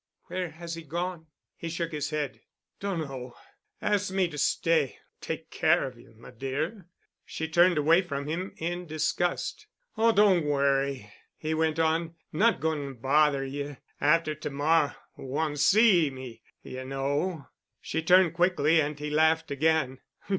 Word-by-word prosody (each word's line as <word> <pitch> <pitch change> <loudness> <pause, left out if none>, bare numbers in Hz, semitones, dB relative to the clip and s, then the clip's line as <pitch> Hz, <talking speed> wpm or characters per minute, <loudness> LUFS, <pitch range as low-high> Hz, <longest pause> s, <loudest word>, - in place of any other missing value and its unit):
"Where 185 -2 -2
has 165 +1 -8
he 165 - -6
gone?" 170 +1 -4 0.3
He 165 - -6
shook 165 0 -3
his 150 -2 -3
head. 150 -2 -3 0.4
"Dunno. 140 -10 -4 0.5
Asked 205 -2 0
me 190 -2 +2
to 150 - -8
stay—take 160 -2 -1
care - - +3
of 130 -2 -7
you, 115 -1 -18
m'dear." 140 - -4 0.4
She 160 - -5
turned 175 +1 +4
away 160 +4 +5
from 140 -6 -4
him, 170 +6 -3
in 175 +2 -3
disgust. 155 +3 -1 0.3
"Oh—don' 210 -6 +4
worry," 140 -6 0 0.2
he 155 0 -2
went 160 0 +1
on—"not 165 +5 +1
goin' 145 -4 -2
bother 140 +2 +2
you. 140 +1 -5 0.2
After 155 +1 +3
t'morr'—won' 150 0 -1
see 185 0 +5
me, 130 -3 -9 0.2
y'know——" 135 +5 -3 0.3
She 160 - -3
turned 180 0 +5
quickly 170 -3 +3
and 150 0 -3
he 150 0 -5
laughed 160 +1 +2
again. 140 -2 +1
155 Hz, 130 wpm, -28 LUFS, 140-170 Hz, 0.5 s, away